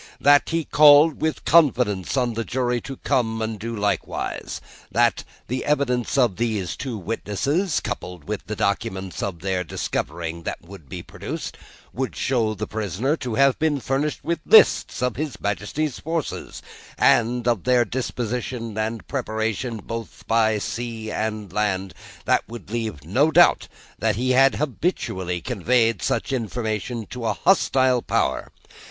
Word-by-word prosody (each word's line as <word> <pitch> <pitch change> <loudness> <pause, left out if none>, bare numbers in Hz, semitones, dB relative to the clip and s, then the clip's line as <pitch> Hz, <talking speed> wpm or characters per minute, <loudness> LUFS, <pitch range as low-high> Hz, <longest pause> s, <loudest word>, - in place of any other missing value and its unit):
That, 145 +1 +5
he 165 -1 -1
called 150 +1 +6
with 155 0 -1
confidence 125 - +3
on 125 -2 +1
the 115 +1 -2
jury 125 0 -1
to 135 - -7
come 115 -3 +1
and 110 -1 -3
do 115 +2 -4
likewise. 100 -3 -2 0.3
That, - - +2 0.2
the 130 +1 -3
evidence 140 -3 0
of 120 -8 +3
these 110 -7 -1
two 125 -5 -4
witnesses, 130 - -1
coupled 90 -4 -6
with 105 0 -4
the 105 - -3
documents 100 -3 -2
of 90 -5 -4
their 95 -1 -1
discovering 85 0 -3
that - - -5
would 85 -5 -13
be - - -6
produced, - - -6 0.4
would 130 +1 -3
show 115 -5 0
the 105 +2 -3
prisoner 110 - -1
to 125 -6 -4
have 140 +2 +4
been 155 -3 +1
furnished 135 +4 -1
with 170 0 -1
lists 445 - +5
of 125 -2 0
his 150 -2 -4
Majesty's 105 +9 -2
forces, 165 -1 -4 0.3
and 120 +1 +3
of 120 -6 +1
their 125 -1 +4
disposition 120 -1 -3
and 110 +1 -3
preparation, 115 -2 -2
both 115 +2 -7
by 110 -1 +3
sea 115 0 -4
and 105 -4 -3
land, 95 -2 -1 0.3
and - - +4
would 115 -4 -10
leave 110 -11 -3
no 130 - +2
doubt - - +5 0.3
that - - +1
he 130 +4 0
had 135 +1 +5
habitually 95 - -2
conveyed 115 -3 +1
such 135 - -1
information 115 -1 -3
to 120 -3 -4
a - - +1
hostile 130 -9 +3
power. - - -1
115 Hz, 150 wpm, -23 LUFS, 105-130 Hz, 0.4 s, called